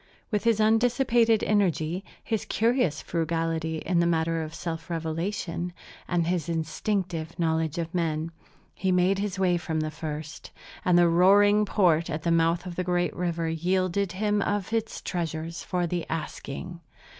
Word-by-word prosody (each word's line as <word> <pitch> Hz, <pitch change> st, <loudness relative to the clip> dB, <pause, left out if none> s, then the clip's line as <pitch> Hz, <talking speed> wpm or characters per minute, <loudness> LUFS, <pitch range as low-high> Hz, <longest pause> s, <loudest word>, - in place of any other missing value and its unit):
With 210 Hz, +1 st, 0 dB
his 230 Hz, -2 st, +3 dB
undissipated 230 Hz, 0 st, +3 dB
energy, 185 Hz, -3 st, +1 dB, 0.2 s
his 220 Hz, -3 st, -1 dB
curious 225 Hz, -, +1 dB
frugality 165 Hz, -1 st, -1 dB
in 175 Hz, +2 st, 0 dB
the 170 Hz, -, +3 dB
matter 165 Hz, -1 st, +1 dB
of 160 Hz, 0 st, -6 dB
self 165 Hz, +1 st, -5 dB
revelation, 170 Hz, +2 st, -3 dB, 0.3 s
and 175 Hz, -1 st, +1 dB
his 175 Hz, 0 st, -1 dB
instinctive 165 Hz, +1 st, -2 dB
knowledge 160 Hz, -2 st, 0 dB
of 165 Hz, +1 st, -3 dB
men, 165 Hz, -2 st, -1 dB, 0.4 s
he 190 Hz, 0 st, -1 dB
made 185 Hz, +2 st, +3 dB
his 200 Hz, -1 st, -2 dB
way 180 Hz, -2 st, +2 dB
from 160 Hz, -2 st, -2 dB
the 155 Hz, 0 st, -2 dB
first, 155 Hz, 0 st, -6 dB, 0.3 s
and 180 Hz, -1 st, +4 dB
the 175 Hz, 0 st, +6 dB
roaring 205 Hz, +5 st, +5 dB
port 175 Hz, -6 st, +2 dB
at 155 Hz, +1 st, -3 dB
the 170 Hz, -, +1 dB
mouth 165 Hz, +1 st, +2 dB
of 175 Hz, -2 st, -7 dB
the 180 Hz, -, 0 dB
great 175 Hz, -3 st, 0 dB
river 170 Hz, -2 st, -1 dB
yielded 185 Hz, +3 st, 0 dB
him 205 Hz, +1 st, +1 dB
of 205 Hz, +1 st, -1 dB
its 225 Hz, -1 st, -2 dB
treasures 165 Hz, -1 st, -3 dB
for 180 Hz, -1 st, -1 dB
the 175 Hz, 0 st, -3 dB
asking. 165 Hz, +2 st, -5 dB
175 Hz, 155 wpm, -27 LUFS, 165-195 Hz, 0.4 s, the